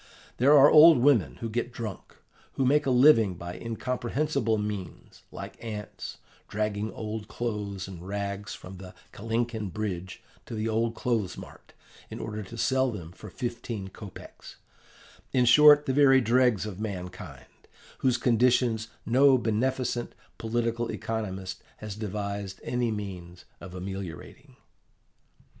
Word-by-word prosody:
There 140 +4 +6
are 140 +1 +9
old 160 +1 +9
women 125 -4 +3
who 115 - -2
get 120 +2 -2
drunk, 110 -6 -7 0.4
who 135 - 0
make 145 +2 +3
a - - +3
living 125 -7 +5
by 85 +1 -7
incomprehensible 120 +1 -1
means, 105 -5 -6
like - - -9
ants, 105 -3 -7 0.3
dragging 105 0 -2
old 110 -1 -5
clothes 105 -6 -4
and 90 -3 -9
rags 100 +1 -4
from 95 +1 -11
the 90 0 -11 0.2
Kalinkin 115 -2 -2
Bridge 95 -3 -5 0.2
to - - -6
the 110 +1 -2
old 115 +1 0
clothes 115 -6 -1
mart, - - -12 0.4
in - - -7
order 105 -1 -5
to 105 +4 -9
sell 130 +2 +2
them 85 -7 -8
for 105 +3 -11
fifteen 115 -3 -5
kopeks 100 0 -11 0.8
in 125 -1 +4
short, 150 +4 +7
the 130 - 0
very 135 -1 +6
dregs 120 -3 +2
of 105 -3 -7
mankind, 95 -4 -6 0.5
whose 125 -2 +2
conditions 120 -2 +2 0.2
no 130 +3 +5
beneficent, 120 +1 -1 0.2
political 115 +1 -1
economist 95 -4 -4 0.2
has 105 -2 -7
devised 100 -2 -4
any 125 -1 -1
means 95 -5 -6
of 90 0 -10
ameliorating. 95 -3 -8
110 Hz, 135 wpm, -27 LUFS, 100-125 Hz, 0.8 s, are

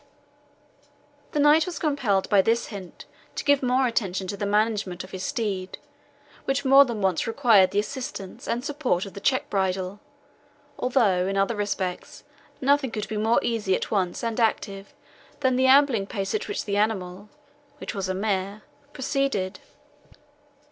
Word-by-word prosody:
The 295 - 0
knight 300 +3 +5
was 355 - -5
compelled 255 - 0
by 200 -2 +5
this 230 +4 0
hint 195 -4 -9 0.3
to - - -3
give 285 -1 +3
more 255 +1 +2
attention 195 -6 -1
to 200 - -3
the 205 0 -3
management 205 -3 0
of 185 - -12
his 185 - -6
steed, 205 -8 -3 0.7
which 270 +1 -1
more 275 +1 +8
than 235 -4 -4
once 185 0 +1
required 225 -6 +4
the 200 - -4
assistance 210 -3 -4
and 240 +3 -2
support 275 -11 -1
of 195 - -10
the - - -7
check 260 +5 +1
bridle, 190 0 -1 0.8
although, 210 -8 +2
in 195 0 -1
other 195 +4 +1
respects, 195 -3 -4 0.4
nothing 280 0 +2
could 215 -2 -4
be 215 - -3
more 220 +2 +2
easy 210 -5 0
at - - -4
once, 190 -2 -1
and 230 0 -2
active, 200 -3 -1 0.5
than 260 -2 +2
the 260 +1 +3
ambling 260 -7 +4
pace 195 -2 -3
at 430 - -2
which 415 - -3
the 200 -1 -1
animal 205 -2 -1 0.5
(which - - -6
was 195 -3 -3
a 185 - -1
mare) 200 0 -2 0.3
proceeded. 270 -8 -1
215 Hz, 160 wpm, -25 LUFS, 195-260 Hz, 0.8 s, more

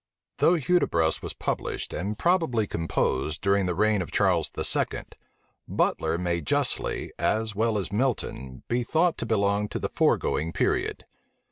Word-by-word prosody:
Though 175 - +4
Hudibras 130 - +2
was - - -5
published, - - -3
and 100 +4 -3
probably 165 - +2
composed, 80 -4 -1
during 100 -1 +2
the 90 - -1
reign 105 +1 +2
of 90 - -5
Charles - - +2
II., - - -1 0.6
Butler 85 - 0
may 85 -1 -1
justly, 70 - -1
as 110 0 0
well 110 +1 +1
as 95 -3 -3
Milton, 105 - -2
be 120 +1 +1
thought 160 +7 +2
to 115 - -3
belong 100 -1 +1
to - - -3
the - - -2
foregoing 80 +2 +1
period. - - 0
105 Hz, 145 wpm, -26 LUFS, 85-120 Hz, 0.6 s, Though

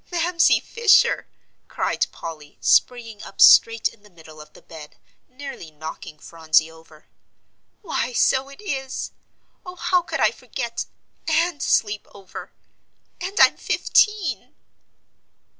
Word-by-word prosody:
"Mamsie 340 0 +2
Fisher!" 460 -3 +3 0.4
cried - - -1
Polly, 155 -3 -10
springing 230 -4 +1
up - - -12
straight 230 -1 +6
in 225 - -14
the 210 - -20
middle 160 -3 -15
of 150 - -16
the - - -17
bed, 155 -2 -12 0.3
nearly 255 - -9
knocking 155 0 -9
Phronsie 160 0 0
over. 160 -1 -19 0.8
"Why, 305 -8 -2
so 265 +2 +1
it 275 - -14
is. 270 -9 -5 0.5
Oh, 360 0 -10
how 365 0 +1
could 345 - -5
I - - +3
forget 235 -4 -6 0.4
and 330 -1 0
sleep 205 -1 0
over. 195 -2 -11 0.7
And 385 +3 -4
I'm - - +6
fifteen!" 420 -5 0
235 Hz, 125 wpm, -22 LUFS, -, 0.8 s, straight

